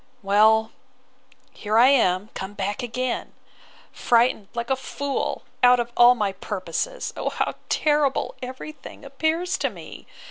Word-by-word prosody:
Well, 220 +3 +4 0.8
here 215 +1 -2
I 245 +3 +7
am, 205 -7 +2
come 190 +2 -7
back 205 0 -3
again! 250 +1 -3 0.6
frightened, 235 -4 +2
like 235 +2 -3
a - - +4
fool, 275 +1 -4 0.2
out 250 0 +6
of 240 0 -3
all 240 +1 +7
my 210 -4 -1
purposes! 200 - -4
O - - -2
how - - -2 0.2
terrible 295 -3 +1
every 260 +4 -7
thing 285 -1 -13
appears 320 +6 -1
to - - 0
me! - - -12
240 Hz, 140 wpm, -23 LUFS, 210-270 Hz, 0.8 s, I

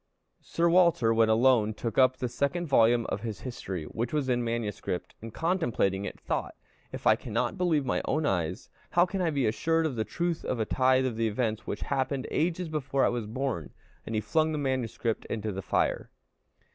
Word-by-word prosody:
Sir 170 0 0
Walter, 170 -10 +4
when 115 0 +4
alone, 110 -2 +4
took 115 +1 -2
up 130 0 +5
the 125 - -2
second 140 +8 -1
volume 120 -5 +4
of 100 - -3
his 110 -3 -5
History, 95 -9 -5
which 115 +9 -4
was 145 -4 -1
in 120 -1 +1
MS., 115 -3 -2 0.4
and 115 +1 -7
contemplating 120 - 0
it, - - -7
thought - - -3 0.4
"If - - -8
I - - +6
cannot - - -2
believe 165 -6 +1
my 130 - 0
own 155 +2 0
eyes, 90 - -2 0.2
how 175 0 +4
can 190 +1 -3
I 175 - +2
be 140 -5 0
assured 165 +9 +1
of 145 -5 -1
the 110 - 0
truth 170 +6 -2
of 125 - -2
a 110 - +1
tithe 130 +1 +3
of 120 -4 -2
the 115 0 +1
events 110 0 -2
which 100 - -4
happened 135 -1 -1
ages 175 +2 0
before 140 -3 0
I - - +3
was 120 -3 -3
born?" 120 - -3 0.3
and 115 - -5
he 105 - +1
flung 155 +5 +1
the - - -1
manuscript 130 -5 -2
into 110 -1 -3
the 95 0 -4
fire. - - 0
130 Hz, 200 wpm, -28 LUFS, 110-155 Hz, 0.4 s, I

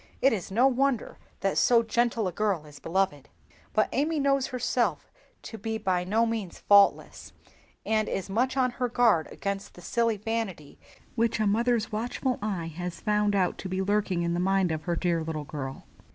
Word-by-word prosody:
It 270 - +4
is 195 -6 -4
no 230 +7 +3
wonder 270 -2 +1 0.2
that 195 - +1
so 235 -1 +5
gentle 230 -2 0
a - - -2
girl 195 -4 -1
is 150 -1 -13
beloved. 165 -6 -1 0.4
But 215 - +2
Amy 300 +4 0
knows 275 -1 +2
herself 250 -1 -1 0.3
to 225 - -8
be 220 +2 -3
by 185 -4 0
no 215 +5 +2
means 225 -6 -3
faultless, 200 -1 +3 0.5
and 215 -1 +1
is 190 - -3
much, 250 +7 0
on 255 -1 +2
her 250 0 -2
guard 235 -9 +3
against 200 0 -4
the 180 - -12
silly 230 +4 0
vanity 210 -8 -4 0.3
which 230 -2 0
a 215 - +2
mother's 225 +2 +1
watchful 245 +3 -2
eye 180 -6 -3
has 175 0 -5
found 210 -1 +1
out 185 -2 +1
to 190 - -5
be 185 +1 -1
lurking 195 -3 0
in 170 0 0
the 175 - -1
mind 190 -1 +2
of 160 -1 -4
her 175 -2 0
dear 170 -1 0
little 155 -2 -4
girl. 135 -3 -6
210 Hz, 185 wpm, -27 LUFS, 180-235 Hz, 0.5 s, so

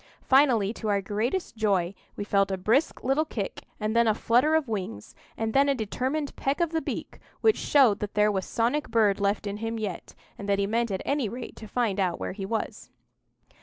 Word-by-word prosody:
Finally, 250 -7 +4
to 220 - -6
our 200 -1 +2
great 220 - -2
joy, 195 -5 +1 0.2
we - - -4
felt 200 -1 +2
a 190 - -1
brisk 225 - +1
little 270 +4 +2
kick, 215 -10 -5
and 215 +1 -1
then 235 0 +4
a 215 - +3
flutter 250 +8 +3
of 315 -4 +1
wings, 185 - -5 0.2
and 225 0 -2
then 280 +1 +4
a 280 - +3
determined 260 +6 -2
peck 275 +4 -1
of 340 -2 +1
the 325 -1 0
beak, - - -5 0.2
which 440 -1 +5
showed 250 -8 +4
that 210 -1 -5
there 210 0 +4
was 190 -2 -1
some 230 +6 0 0.2
bird 215 -3 +3
left 200 +1 0
in 200 0 -3
him 225 +1 -3
yet, 205 -6 -5 0.2
and 200 - -5
that 200 - +3
he 200 - +1
meant 230 +3 0
at 190 -1 -3
any 280 -6 0
rate 245 +2 -7
to 220 - -10
find 210 -3 0
out 180 -3 0
where - - -3
he 195 -1 -5
was. 225 +2 -4
220 Hz, 215 wpm, -27 LUFS, 200-255 Hz, 0.2 s, which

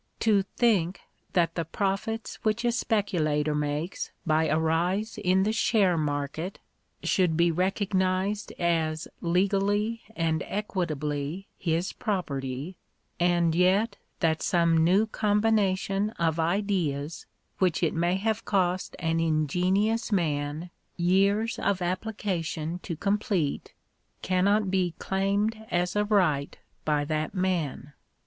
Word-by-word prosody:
To 210 -3 +4
think 195 -3 +1 0.3
that 170 -3 +2
the 165 - -1
profits 200 +6 -2
whioh 220 +2 +1
a - - +3
speculator 165 -11 0
makes 150 +4 -2 0.2
by 160 0 +3
a 155 +1 +2
rise 180 +7 0
in 190 -1 +3
the 210 - +1
share 205 -5 +3
market, 150 +4 -2 0.5
should 180 -5 +2
be 170 0 +4
recognised 190 +2 0
as 165 -1 0
legally 200 +5 +1
and 165 -1 0
equitably 155 -4 -3
his 170 +2 -1
property, 145 - -3 0.4
and 175 -1 +3
yet 185 +6 +2 0.2
that 160 -2 +2
some 170 -3 +3
new 180 +6 +4
combination 210 -2 +1
of 165 -1 0
ideas, 165 -4 -1 0.3
which 180 -2 +1
it 165 - +2
may 175 +2 +1
have 215 +3 -1
cost 185 -2 0
an 165 0 0
ingenious 180 +9 +1
man 155 -2 -1 0.3
years 195 +5 +2
of 200 - +1
appli 185 +4 -3
cation 165 -3 -2
to 175 -2 -5
complete, 200 - -1 0.5
cannot 195 +2 +2
be 180 -3 +1
" - - -41
claimed 200 +3 0
as 180 +1 0
a 210 0 +2
right" 175 -9 +1 0.3
by 150 -1 +1
that 155 +4 -2
man! 165 -7 -1
180 Hz, 120 wpm, -27 LUFS, 160-200 Hz, 0.5 s, To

